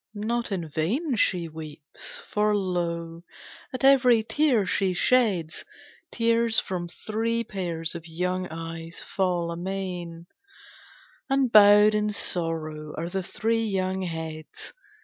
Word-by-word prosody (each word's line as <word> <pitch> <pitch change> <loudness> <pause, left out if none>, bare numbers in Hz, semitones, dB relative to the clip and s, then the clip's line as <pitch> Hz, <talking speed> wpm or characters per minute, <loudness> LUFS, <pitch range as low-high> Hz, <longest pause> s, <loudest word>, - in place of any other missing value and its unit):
Not 230 +2 -2
in 175 -4 -2
vain 220 - -1
She 180 -5 +1
weeps, 155 -2 -9
for 210 0 +1
lo! 170 -3 -2 0.5
at 255 - -5
every 255 -4 +6
tear 235 -1 +2
she 185 -1 0
sheds 195 -8 +2 0.5
Tears 230 -1 +2
from 180 -2 -4
three 225 +6 -2
pairs 170 -6 -4
of 170 -1 -8
young 180 +3 -2
eyes 165 0 -7
fall 180 -3 -1
amain, 175 -1 -5 1.0
And 270 -2 +2
bowed 210 0 +8
in 210 0 +1
sorrow 160 -6 -3
are 165 +2 -3
the 190 +1 -2
three 225 +5 -1
young 190 -3 -1
heads. 160 -3 -6
185 Hz, 120 wpm, -26 LUFS, 165-220 Hz, 1.0 s, bowed